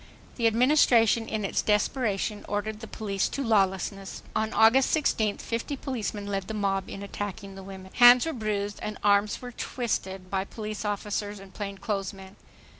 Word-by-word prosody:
The 230 -2 +3
Administration, 230 -2 +4
in 215 -2 -2
its - - 0
desperation, 210 -1 0
ordered 210 +1 -2
the 225 - -8
police 200 -3 -2
to 275 - -3
lawlessness. 195 -3 0
On 220 0 0
August 245 +7 +5
16th, 220 -9 0
fifty 235 +5 -3
policemen 220 -7 -4
led 195 -2 -3
the 220 - -4
mob 195 -2 -1
in 195 - -7
attacking 200 0 -6
the 195 - -9
women. 190 -1 -10
Hands 245 +1 +8
were 325 - -2
bruised 205 -3 -2
and 210 -1 -4
arms 205 0 +3 0.2
twisted 190 -6 -3
lit' 190 0 -1
police 215 -1 -5
officers 205 0 -2
and 195 -1 -13
plainclothes 200 -1 -3
men. 190 0 -12
210 Hz, 160 wpm, -27 LUFS, 195-225 Hz, 0.2 s, Hands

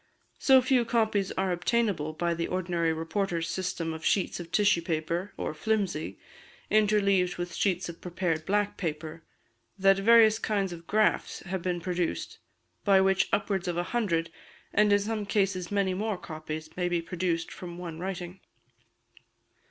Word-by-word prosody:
So 265 -2 +6
few 255 -1 +3
copies 220 -4 +1
are 190 0 0
obtainable 180 -4 0
by 170 +2 0
the 170 0 -2
ordinary 175 -2 0
reporters' 165 +1 -2
system 175 -2 -2
of 160 0 -8
sheets 190 +1 +1
of 170 -1 -8
tissue 205 -2 +3
paper, 170 +3 -2
or - - -3
"flimsy," 175 - -1 0.5
interleaved 200 -4 +3
with 175 0 -4
sheets 185 -3 0
of 170 -1 -9
prepared 175 -3 -2
black 205 +1 +1
paper, 160 -1 -4 0.6
that 195 0 +4
various 220 +1 +6
kinds 200 -5 -1
of 165 -1 -11
"graphs" 215 +1 +1
have 190 -1 -4
been 180 0 -1
produced, 175 0 -3 0.4
by 195 -2 +5
which 190 0 +3
upwards 195 -2 0
of 175 -1 -1
a 175 - +1
hundred, 170 -8 0 0.4
and 210 0 +4
in 205 - +6
some 215 +1 -2
cases 195 -4 0
many 200 -2 +1
more, 210 +1 -2
copies 155 -1 -7
may 180 -1 0
be 175 -1 +1
produced 165 0 -2
from 175 -1 -8
one 170 -2 -7
writing. 180 0 -5
180 Hz, 155 wpm, -28 LUFS, 170-205 Hz, 0.6 s, So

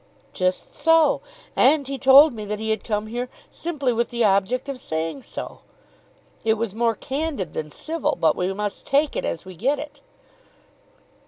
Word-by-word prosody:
"Just 185 0 -1
so; 325 +1 +4 0.3
and 280 +1 +4
he 275 -1 -4
told 275 +2 +8
me 215 -2 -6
that 210 +1 -3
he 220 +1 -2
had 220 -2 -1
come 210 -1 -1
here 240 +3 -4 0.2
simply 290 -7 -2
with 235 +1 0
the 235 -1 0
object 200 +7 +1
of 275 -2 -5
saying 160 +8 -3
so. - - -7 0.8
It 220 0 +3
was 225 -2 -3
more 230 0 +1
candid 275 - -3
than 155 -1 -4
civil, 320 - -2
but 160 -2 +3
we 180 +1 -1
must 205 +1 -4
take 285 +2 +2
it - - -2
as 170 - -3
we 185 - -9
get 265 - +1
it." 295 +1 -9
235 Hz, 175 wpm, -23 LUFS, 200-280 Hz, 0.8 s, told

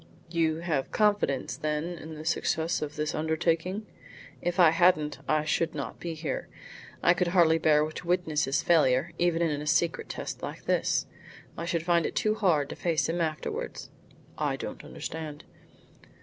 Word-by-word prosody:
"You 165 -1 +1
have 155 -6 -1
confidence 205 -11 +1
then 150 0 -1 0.2
in 160 0 -8
the 155 +1 -8
success 165 0 0
of 150 0 -4
this 155 0 -2
undertaking?" 165 +5 0 0.6
"If 175 +2 -2
I 170 -3 +8
hadn't, 160 -5 +3
I 155 0 +2
should 160 +1 0
not 140 - -5
be 170 -2 -4
here. 155 -1 -4 0.6
I 175 - +6
could 180 0 0
hardly 170 -2 +4
bear 155 -1 +4
to 155 +2 -8
witness 175 -4 +1
his 135 +1 0
failure, 155 -2 +3
even 170 -1 +2
in 150 -3 0
a 150 - -6
secret 165 +2 +1
test - - -5
like - - -6
this. - - +1 0.5
I 170 - -4
should 170 -1 -1
find 170 -1 +2
it - - -7
too 215 - +2
hard 165 -10 +2
to - - -5
face 165 -2 0
him 170 +2 -1
afterwards." 155 -2 -3 0.5
"I - - 0
don't - - -7
understand." 155 -1 -6
160 Hz, 170 wpm, -28 LUFS, 155-175 Hz, 0.6 s, I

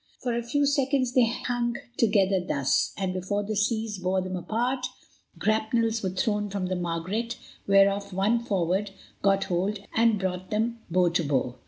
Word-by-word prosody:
For 245 -2 0
a 235 - 0
few 285 +5 +1
seconds 275 -2 +1
they 250 -3 +5
hung 240 0 -1 0.2
together 200 -4 +3
thus, 140 -6 +1
and, 190 -2 -1
before 190 +3 -2
the 215 +1 -3
seas 215 0 0
bore 185 +1 +1
them 185 0 -3
apart, 245 +7 -1 0.5
grapnels 220 +1 +1
were 190 - -1
thrown 210 0 -1
from 195 -1 -2
the 185 0 -1
Margaret 185 +7 -2 0.3
whereof 200 0 +4
one 200 +5 +2
forward 195 -1 0 0.3
got 195 0 +3
hold 190 +2 -1 0.2
and 230 -1 +4
brought 185 -1 -3
them 230 +2 -1
bow 180 +1 +3
to 170 0 0
bow. 130 -4 0
205 Hz, 165 wpm, -27 LUFS, 185-230 Hz, 0.5 s, they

